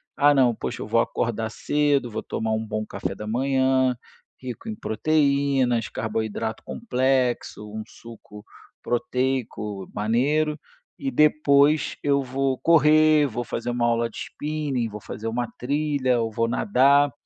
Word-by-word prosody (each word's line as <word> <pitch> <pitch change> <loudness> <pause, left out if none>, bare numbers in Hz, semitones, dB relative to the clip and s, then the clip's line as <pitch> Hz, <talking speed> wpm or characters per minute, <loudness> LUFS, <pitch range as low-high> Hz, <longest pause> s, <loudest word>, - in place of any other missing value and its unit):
"Ah, 145 +1 +5
não, 130 -4 +4
poxa, - - -5
eu - - -5
vou - - +2
acordar 110 0 -2
cedo, 145 +1 0
vou - - -3
tomar 110 0 -3
um 110 0 -1
bom 110 0 -3
café 95 - -5
da 105 - -7
manhã, 130 +1 +2 0.5
rico 130 - -7
em 220 - -4
proteínas, 140 - +1
carboidrato 110 0 -3
complexo, 130 - -1
um 110 +1 -5
suco 110 -2 -13 0.4
proteico 120 -5 -2
maneiro 145 +8 +1 0.4
e 275 - -2
depois, 150 - +3
eu 140 -1 +2
vou 135 +1 -1
correr, 155 -2 +5
vou 120 -1 -4
fazer 120 0 -4
uma 120 -1 0
aula 115 0 +1
de - - -12
spinning, 145 -5 -3
vou 105 0 -8
fazer 110 +3 -7
uma 120 +2 -2
trilha 140 -2 0
ou 115 -1 -2
vou 115 +2 0
nadar. 140 - +3
130 Hz, 145 wpm, -24 LUFS, 115-145 Hz, 0.5 s, Ah